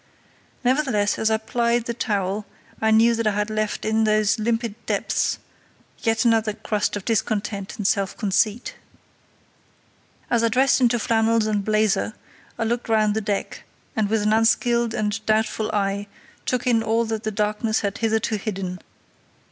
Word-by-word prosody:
Nevertheless, 245 -6 +1
as 220 - +2
I 220 - +2
plied 235 +1 0
the 235 - -2
towel, 205 -3 -2 0.3
I 220 - +3
knew 225 +2 +5
that 230 -1 0
I 210 - +2
had 210 +1 -1
left 215 -1 -2
in 220 +1 +2
those 215 0 +2
limpid 230 0 -1
depths - - 0 0.6
yet 225 +1 +1
another 225 -2 +3
crust 210 0 -2
of 205 - -6
discontent 205 -3 -2
and 205 - -4
self 195 -1 0
conceit. 215 +2 0 1.6
As 235 -1 +3
I - - +4
dressed 260 +3 +3
into 240 -1 +3
flannels 225 0 +2
and 210 -2 0
blazer, 215 0 +1 0.4
I - - -1
looked 235 +1 -2
round 215 -2 +3
the 220 - -1
deck, 200 -1 -3 0.3
and 215 -2 +1
with 220 -1 +1
an 210 +1 +2
unskilled 235 +1 +2
and 210 -2 -2
doubtful 220 0 +1
eye 200 0 -1 0.4
took 250 0 0
in 235 -3 +3
all 225 +1 +1
that 220 -1 -3
the 215 - -2
darkness 215 +1 0
had 200 -1 -3
hitherto 220 -1 0
hidden. 185 -3 -4
220 Hz, 160 wpm, -23 LUFS, 210-230 Hz, 1.6 s, knew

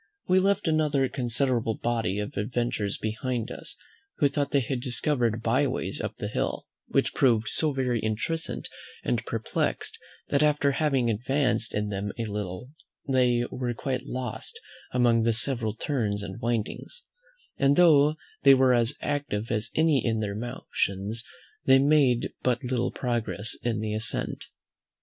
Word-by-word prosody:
We 185 +1 +5
left 200 0 +1
another 150 -4 +2
considerable 120 -2 0
body 115 -5 -1
of 105 0 -3
adventurers 110 -2 -1
behind 115 +2 -3
us - - -7 0.4
who 145 - +4
thought 140 -1 -1
they 140 -1 +2
had 125 +1 -2
discovered 120 -3 +1
byways 130 +3 0
up - - -4
the - - -3
hill, - - -2 0.2
which - - +1
proved 115 -5 +3
so 155 -2 +1
very 130 -3 0
intricate 110 +10 -2 0.4
and - - 0
perplexed, - - -2 0.3
that 140 - +2
after 150 -1 +3
having 135 -4 +1
advanced 120 0 0
in 105 0 -1
them 100 0 -3
a 115 - -2
little 105 +3 -5 0.4
they 125 -3 +3
were 125 -2 -2
quite 130 +2 -3
lost 125 -3 -5 0.3
among 120 -2 +3
the 115 0 +2
several 115 -2 +1
turns 110 -8 -1
and 95 -1 -7
windings; 120 - -3 0.6
and 140 0 +4
though 155 -3 +6 0.3
they 135 -1 +8
were 130 -1 +4
as 120 +2 +2
active 145 -7 -2
as 110 -1 -1
any 160 -3 +3
in 115 -2 0
their 105 -2 -2
motions, 110 -2 -2 0.4
they 135 0 +7
made 135 -3 +3
but 125 0 0
little 125 -1 0
progress 115 -3 -2
in 115 -2 -1
the 110 -1 -2
ascent. 110 +1 -2
120 Hz, 150 wpm, -27 LUFS, 110-140 Hz, 0.6 s, they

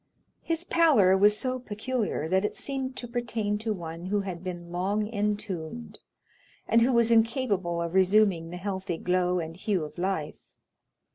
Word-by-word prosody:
His 330 0 -2
pallor 290 - +4
was 205 +2 +5
so 255 +1 -1
peculiar, 220 - -2
that 190 +3 +2
it 210 - -2
seemed 265 -2 -4
to 240 - -6
pertain 230 -3 -2
to 220 0 -2
one 170 -2 -5
who 205 +1 +1
had 185 -3 -6
been 175 -2 -6
long 195 +4 0
entombed, 200 - -3 0.7
and 230 - +4
who 245 +3 +4
was 235 -1 +3
incapable 225 -7 +2
of 170 0 -3
resuming 190 -3 +3
the 175 - -6
healthy 190 -2 -3
glow 180 +1 +1
and 165 -1 -4
hue 190 -1 -1
of 150 +3 -8
life. 175 -5 -2
200 Hz, 160 wpm, -27 LUFS, 175-230 Hz, 0.7 s, was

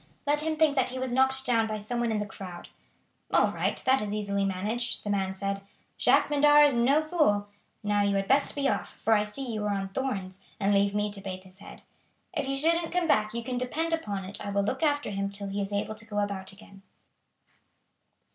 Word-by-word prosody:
Let 295 +1 +2
him 315 0 -1
think 305 -2 +4
that 265 - +2
he 255 - -5
was 260 -1 -2
knocked 265 +1 +2
down 230 -2 +2
by 215 -1 -3
some 215 +4 -4
one 235 -1 0
in 220 - 0
the 210 - -1
crowd." 185 -3 -9 0.6
"All - - +4
right! - - -1
That 265 +1 +4
is 210 0 -3
easily 200 -1 -1
managed," 210 +6 -1
the 205 - -2
man 190 -1 -1
said. 195 0 -3 0.4
"Jacques - - +5
Medart 295 0 +6
is 285 -3 +3
no 270 +6 +3
fool. 300 -12 +2 0.4
Now 205 0 +2
you 200 0 +2
had 195 0 0
best 275 +2 +3
be 280 -1 +1
off, - - -1
for 225 - +1
I 210 -1 +4
see 210 +6 -6
you 215 -1 -2
are 205 -1 0
on 195 0 -3
thorns, 195 -5 -3 0.2
and 200 0 +2
leave 200 0 +2
me 210 0 0
to 200 -1 -9
bathe 185 -1 -6
his 190 0 -18
head. - - -12 0.5
If 295 -5 -2
you 275 0 -1
shouldn't 330 +3 +2
come 355 -1 +1
back 215 -5 +2
you 235 - -3
can 250 0 -3
depend 320 +7 -1
upon 205 -12 -2
it 200 +3 -7
I 205 - -4
will 200 0 +1
look 260 +6 -2
after 290 -6 +1
him 195 0 -2
till 200 0 -5
he 200 +1 -2
is 195 0 -4
able 205 +1 -2
to 220 +1 -10
go 210 -2 -6
about 200 -2 -2
again." 195 -1 -15
210 Hz, 230 wpm, -28 LUFS, 200-265 Hz, 0.6 s, Medart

